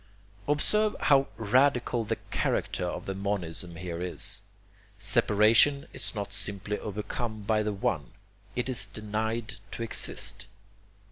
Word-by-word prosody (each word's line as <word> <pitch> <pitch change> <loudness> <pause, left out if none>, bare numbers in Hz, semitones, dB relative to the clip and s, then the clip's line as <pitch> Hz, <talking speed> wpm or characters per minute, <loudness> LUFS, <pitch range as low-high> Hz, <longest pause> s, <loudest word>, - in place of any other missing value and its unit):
Observe 210 +9 +3
how 140 -1 +4
radical 125 +1 +2
the 110 +1 -1 0.2
character - - -1
of 90 - -4
the 95 - -3
monism 90 -3 -3
here 85 0 -5
is. 90 -1 0 0.6
Separation 115 +7 +4
is 130 - -1
not 100 -1 -4
simply 100 +1 -2
overcome 105 +1 -4
by 110 +1 +2
the 105 0 -1
One, 90 -8 -2 0.4
it 125 - -1
is 115 -8 +3
denied 110 +2 -3 0.2
to 115 - -4
exist. 115 - +1
105 Hz, 125 wpm, -28 LUFS, 100-120 Hz, 0.6 s, how